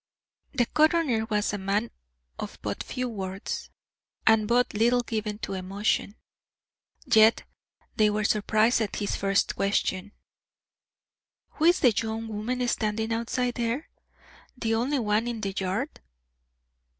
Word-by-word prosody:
The 245 -2 +3
coroner 310 -6 +2
was 210 -2 0
a 205 - -2
man 200 +4 -1 0.5
of - - -6
but - - -3
few 255 0 -3
words, 195 -4 -5 0.6
and 220 -1 +4
but 245 +2 +2
little 240 +3 +3
given 215 -2 -3
to - - -5
emotion. 195 +2 -1 0.9
Yet 220 +1 +5 0.5
they 215 -1 +5
were 210 +1 -1
surprised 215 +3 +2
at 210 - -2
his 205 - -2
first 195 0 +1
question: 195 0 -1 1.4
"Who 315 - -2
is 345 +2 +5
the 250 - +6
young 225 +1 -3
woman 245 +4 -2
standing 220 0 -1
outside 240 +2 -1
there, 240 +5 -2 0.7
the 225 -2 -1
only 250 +6 +1
one 220 -1 +1
in 235 -2 -3
the 195 -2 -2
yard?" 195 +10 -3
220 Hz, 130 wpm, -27 LUFS, 210-240 Hz, 1.4 s, the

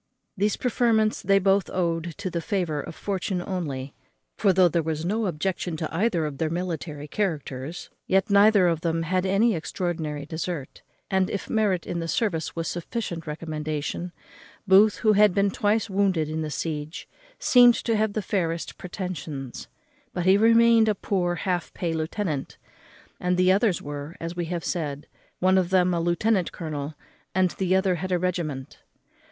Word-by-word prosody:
These 205 +1 +1
preferments 225 -3 +1
they 195 0 +4
both 195 0 +2
owed 170 -2 -1
to 185 - -4
the 170 - -2
favour 170 -7 -1
of 160 - -9
fortune 190 -1 -2
only; 150 -8 -4 0.4
for, 195 - +3
though 185 -1 +5
there 170 0 +1
was 160 0 -3
no 215 +3 0
objection 175 0 -2
to 155 0 -4
either 180 -4 +1
of 145 -3 -5
their 160 - 0
military 165 -4 -4
characters, 155 -5 -3 0.2
yet 190 +1 +2
neither 200 -2 +6
of 165 -2 0
them 165 -1 0
had 185 +3 0
any 210 +5 +3
extraordinary 160 -3 -3
desert; 160 -2 -5 0.3
and, 190 -1 +2
if 200 - -4
merit 205 -6 +1
in 175 - -3
the 165 - -3
service 165 -5 -1
was 165 0 -2
a 175 - -3
sufficient 170 -5 -5
recommendation, 155 +2 -4 0.6
Booth, 200 +3 +6
who 215 -2 +3
had 205 -2 +5
been 200 0 +2
twice 215 0 +1
wounded 190 -6 +1
in 160 +1 -2
the 155 - -3
siege, 150 0 -4 0.3
seemed 245 -2 +6
to 230 - -1
have 215 -1 +1
the 215 - -2
fairest 170 -5 -2
pretensions; 165 -8 -6 0.5
but 175 - -1
he 190 +1 +6
remained 230 +1 +5
a 210 - +1
poor 180 -3 -1
half 180 -1 -2
pay 170 -2 -2
lieutenant, 160 -2 -3 0.6
and 180 0 0
the 185 0 +4
others 200 -1 +2
were, 145 +2 -6
as 165 +1 -5
we 175 -1 -2
have 170 0 -4
said, 150 -4 -3 0.3
one 185 +1 +4
of 180 -2 -1
them 180 -1 +3
a 170 - 0
lieutenant 180 +3 +1
colonel, 150 -2 -5 0.4
and 185 -1 +3
the 185 -1 0
other 190 -1 +2
had 185 0 -3
a 180 - +3
regiment. 170 -7 -3
180 Hz, 170 wpm, -25 LUFS, 160-195 Hz, 0.6 s, neither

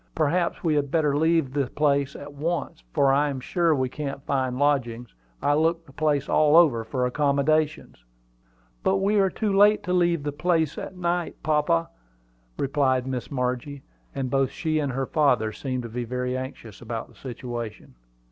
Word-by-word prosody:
Perhaps 170 +3 0
we 160 -3 +2
had 145 -2 0
better 150 -2 +1
leave 160 -3 +2
the 140 -2 0
place 140 0 +1
at 145 0 -9
once, 160 - -3
for 135 - +3
I 145 +2 +2
am 135 -2 -4
sure 165 +4 +1
we 130 -2 0
can't 140 +1 -5
find 130 -2 -1
lodgings. 125 -5 0 0.3
I 145 - +3
looked 165 +2 +1
the 135 - -16
place 150 -1 0
all 150 0 +4
over 140 -10 +5
for 125 +3 -1
accommodations." 145 - 0 0.8
"But 195 - +2
we 200 +2 +2
are 195 -1 +3
too 205 0 -1
late 205 +2 +5
to 180 - -2
leave 170 -4 +2
the 145 - -2
place 160 0 +1
to - - -6
night, 175 0 -1
papa," 150 - +1 0.7
replied 135 -2 +1
Miss 130 -3 -4
Margie, 130 +1 -3 0.3
and 130 -2 -3
both 135 -1 +2
she 155 -2 -1
and 145 -3 -1
her 135 +1 -1
father 125 -8 +2
seemed 130 +2 -4
to 115 - -6
be 120 +2 -4
very 125 +1 -3
anxious 130 -5 -7
about 115 -1 -5
the - - -19
situation. 120 - -7
140 Hz, 175 wpm, -25 LUFS, 130-155 Hz, 0.8 s, over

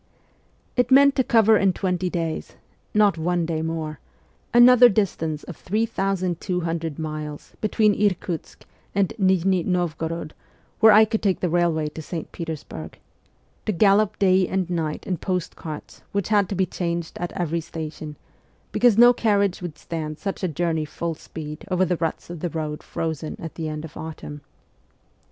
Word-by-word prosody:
' - - -39
It 245 0 +3
meant 275 +1 +6
to 260 - +4
cover 225 -2 +5
in 195 -2 +3
twenty 180 -1 -1
days 165 -3 -3 0.4
not 205 -5 +3
one 175 +1 0
day 160 -1 -2
more 160 -2 -4 0.5
another 245 0 +8
distance 165 -7 -1
of 175 - -8
3,200 180 -6 -2
miles 155 -1 -6
between 215 0 +3
Irkutsk 185 -5 -2 0.3
and 195 -2 +1
Nijni 185 -1 +3
N6vgorod, 165 -3 -2 0.5
where 220 -1 +8
I 215 +1 +8
could 220 0 -2
take 195 -3 +1
the 180 - 0
railway 170 -3 +1
to 160 - -8
St. 160 +1 -6
Petersburg; 155 - -7 0.7
to - - +3
gallop 200 +2 +3
day 185 -2 +4
and 190 -2 -1
night 160 -3 -2
in 185 -3 -1
post 180 +1 -3
carts 155 -2 -8
which 200 -1 -1
had 205 -3 +3
to 200 - -2
be 190 0 +2
changed 170 -1 -4
at 175 - -3
every 170 -1 -1
station, 155 -1 -7 0.6
because 240 -4 +4
no 240 +1 +8
carriage 200 -6 +1
would 170 -4 -6
stand 155 -2 -5
such 195 +2 -4
a - - +2
journey 160 0 -1
full 165 +2 -4
speed 150 -1 -8
over 185 0 +2
the 180 -1 0
ruts 165 +1 -3
of 175 - -7
the 175 - -2
roads 155 -1 -4
frozen 160 -1 -4
at 165 - -7
the 160 -2 -4
end 155 +1 -5
of 155 - -11
the - - -10
autumn. 150 -2 -7
175 Hz, 165 wpm, -23 LUFS, 160-195 Hz, 0.7 s, another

